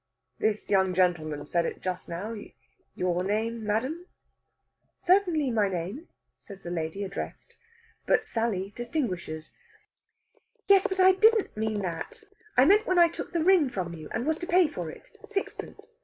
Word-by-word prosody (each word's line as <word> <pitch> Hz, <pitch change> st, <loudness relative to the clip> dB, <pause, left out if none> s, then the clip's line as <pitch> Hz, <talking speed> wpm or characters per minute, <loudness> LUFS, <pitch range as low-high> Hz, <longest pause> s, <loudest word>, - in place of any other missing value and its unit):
"This 215 Hz, -1 st, -1 dB
young 190 Hz, -2 st, +3 dB
gentleman 155 Hz, -5 st, +1 dB
said 170 Hz, +3 st, +1 dB
it -, -, -4 dB
just 185 Hz, 0 st, -4 dB
now. 190 Hz, +7 st, -4 dB, 0.6 s
Your 180 Hz, 0 st, 0 dB
name, 220 Hz, +3 st, -1 dB
madame?" 260 Hz, -, -2 dB, 0.9 s
"Certainly, 350 Hz, -7 st, +2 dB
my 210 Hz, -3 st, +2 dB
name," 190 Hz, -, -4 dB, 0.3 s
says 195 Hz, -2 st, -12 dB
the 175 Hz, -, -5 dB
lady 165 Hz, +3 st, -3 dB
addressed. 195 Hz, 0 st, -6 dB, 0.5 s
But 450 Hz, -3 st, +3 dB
Sally 205 Hz, -, -2 dB
distinguishes: 195 Hz, -, -3 dB, 1.2 s
"Yes, 395 Hz, -1 st, +6 dB
but 380 Hz, 0 st, -3 dB
I 375 Hz, 0 st, +8 dB
didn't 435 Hz, +3 st, +3 dB
mean 215 Hz, -1 st, -1 dB
that. 185 Hz, -, -5 dB, 0.3 s
I 255 Hz, -, +7 dB
meant 415 Hz, +6 st, +5 dB
when 370 Hz, -, +2 dB
I 340 Hz, -1 st, +7 dB
took 340 Hz, -, -7 dB
the 335 Hz, -2 st, 0 dB
ring 350 Hz, -6 st, +5 dB
from 185 Hz, -7 st, -4 dB
you, 155 Hz, -2 st, -9 dB
and 235 Hz, -, -3 dB
was 315 Hz, +1 st, 0 dB
to 350 Hz, -, -5 dB
pay 355 Hz, -1 st, +5 dB
for 175 Hz, -, -5 dB
it. -, -, -12 dB, 0.2 s
Sixpence. 430 Hz, +3 st, -6 dB
220 Hz, 155 wpm, -28 LUFS, -, 1.2 s, I